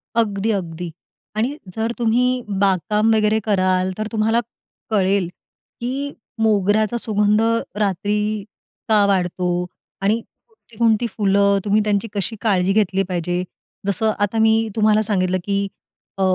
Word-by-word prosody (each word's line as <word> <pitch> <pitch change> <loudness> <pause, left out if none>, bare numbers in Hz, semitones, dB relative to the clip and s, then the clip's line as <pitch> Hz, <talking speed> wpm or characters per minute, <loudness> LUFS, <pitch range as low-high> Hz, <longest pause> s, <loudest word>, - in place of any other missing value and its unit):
अगदी, 215 -1 +1
अगदी. 175 -4 -4 0.4
आणि 245 +7 -1 0.2
जर 225 +1 -1
तुम्ही 235 +1 +2 0.4
बागकाम 210 +3 +2
वगैरे 215 0 +2
कराल, 185 -2 +2
तर 215 0 -2
तुम्हाला 225 +1 +2 0.5
कळेल 195 -3 +2 0.5
की 275 +4 -3 0.3
मोगऱ्याचा 215 +1 +2
सुगंध 210 -1 +2 0.4
रात्री 205 +1 0 0.7
का 210 -2 +5
वाढतो 180 -2 0 0.5
आणि 215 +4 +2 0.6
कोणती 230 0 +3
फुलं, 200 -1 +2
तुम्ही 210 +1 +3
त्यांची 210 +1 0
कशी 205 +2 -2
काळजी 195 -4 +2
घेतली 195 -2 +2
पाहिजे? 180 0 -1 0.4
जसं 215 +2 +1
आता 205 +2 0
मी 220 0 +3
तुम्हाला 215 -1 +4
सांगितलं, 185 -3 +1
की 200 0 0 0.5
अ, - - -3
210 Hz, 120 wpm, -21 LUFS, 195-220 Hz, 0.7 s, का